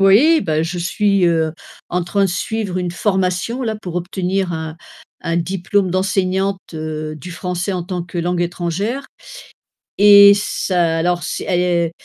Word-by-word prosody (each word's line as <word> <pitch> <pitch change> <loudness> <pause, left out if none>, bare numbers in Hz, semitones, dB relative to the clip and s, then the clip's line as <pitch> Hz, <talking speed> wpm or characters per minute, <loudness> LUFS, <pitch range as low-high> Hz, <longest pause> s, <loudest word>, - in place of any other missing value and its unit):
Oui 245 +13 +6
ben 155 -1 0
je 175 +2 -4
suis, 200 +2 +1
heu, 160 -2 +1 0.4
en 180 0 -1
train 200 +4 0
de - - +1
suivre 195 0 -2
une 180 -1 -2
formation 190 +5 -1
là 220 -3 -2
pour 180 -5 -8
obtenir 180 +1 -2
un 160 0 -5 0.5
un 165 0 0
diplôme 185 +2 0
d'enseignante, 190 +1 0
heu, 155 -1 -4
du 175 +4 -9
français 180 +2 -3
en 180 -2 -2
tant 180 0 -4
que 175 0 -7
langue 175 +1 -1
étrangère 180 +9 -3 0.9
et 200 0 +9
ça 175 -4 0
alors 175 +2 +1
s 175 - -4
é 175 -2 +1
180 Hz, 155 wpm, -18 LUFS, 170-195 Hz, 0.9 s, et